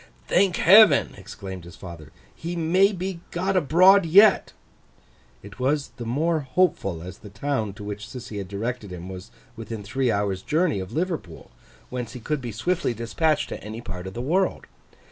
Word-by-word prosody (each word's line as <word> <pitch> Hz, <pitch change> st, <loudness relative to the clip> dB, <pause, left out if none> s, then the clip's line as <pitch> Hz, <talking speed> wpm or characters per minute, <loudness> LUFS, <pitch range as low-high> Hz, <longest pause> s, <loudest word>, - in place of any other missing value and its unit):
'Thank 185 Hz, -1 st, +3 dB
Heaven!' 210 Hz, +5 st, +6 dB
exclaimed 95 Hz, -2 st, -9 dB
his 85 Hz, +1 st, -12 dB
father. 85 Hz, -5 st, -11 dB, 0.2 s
'He 170 Hz, +2 st, -5 dB
may 180 Hz, +5 st, +3 dB
be 185 Hz, -2 st, -4 dB
got 190 Hz, +3 st, -1 dB
abroad 185 Hz, +4 st, +5 dB
yet.' 195 Hz, +5 st, +5 dB, 0.9 s
It 100 Hz, -1 st, -12 dB
was 140 Hz, +3 st, 0 dB
the 120 Hz, -2 st, -6 dB
more 160 Hz, +7 st, +1 dB
hopeful 135 Hz, -, 0 dB
as 90 Hz, +2 st, -9 dB
the 105 Hz, -, -12 dB
town 110 Hz, -1 st, -2 dB
to 105 Hz, 0 st, -10 dB
which 105 Hz, +1 st, -6 dB
Sissy 110 Hz, -5 st, -7 dB
had 95 Hz, -, -6 dB
directed 105 Hz, +1 st, -4 dB
him 90 Hz, 0 st, -8 dB
was 95 Hz, 0 st, -9 dB, 0.3 s
within 110 Hz, -1 st, -7 dB
three 130 Hz, +5 st, -1 dB
hours' 100 Hz, -2 st, -1 dB
journey 155 Hz, -, 0 dB
of 95 Hz, +1 st, -7 dB
Liverpool, 160 Hz, -, -4 dB, 0.4 s
whence 120 Hz, -3 st, -5 dB
he 125 Hz, -, -7 dB
could 150 Hz, +4 st, -3 dB
be 120 Hz, -2 st, -5 dB
swiftly 165 Hz, -, -1 dB
dispatched 130 Hz, +4 st, 0 dB
to -, -, -7 dB
any 110 Hz, +2 st, -7 dB
part 90 Hz, -6 st, -7 dB
of 95 Hz, -, -8 dB
the 120 Hz, -, -4 dB
world. 185 Hz, +8 st, 0 dB
125 Hz, 175 wpm, -24 LUFS, 100-170 Hz, 0.9 s, Heaven